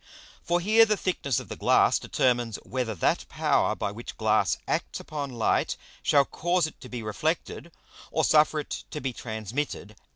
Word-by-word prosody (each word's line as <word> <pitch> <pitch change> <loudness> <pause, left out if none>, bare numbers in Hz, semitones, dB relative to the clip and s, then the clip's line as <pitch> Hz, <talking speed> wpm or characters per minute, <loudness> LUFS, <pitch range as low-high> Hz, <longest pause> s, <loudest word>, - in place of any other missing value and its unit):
For 175 +1 +1
here 215 +5 +5
the 215 -2 +2
thickness 140 - -1
of - - -9
the - - -6
Glass - - +4
determines 120 -3 0
whether 125 -4 -3
that 85 - 0
Power - - +1
by 100 - -2
which 115 +3 -9
Glass 110 -3 +2
acts - - -2
upon 145 -3 -5
Light 115 -2 0 0.2
shall 140 -1 +4
cause 175 +3 0
it 155 - -9
to 125 - -10
be 120 -2 -5
reflected, 160 - -2 0.4
or 160 - 0
suffer 155 0 +4
it - - -6
to 150 - -5
be 135 -3 -3
transmitted. 110 0 -4
135 Hz, 170 wpm, -27 LUFS, 110-160 Hz, 0.4 s, here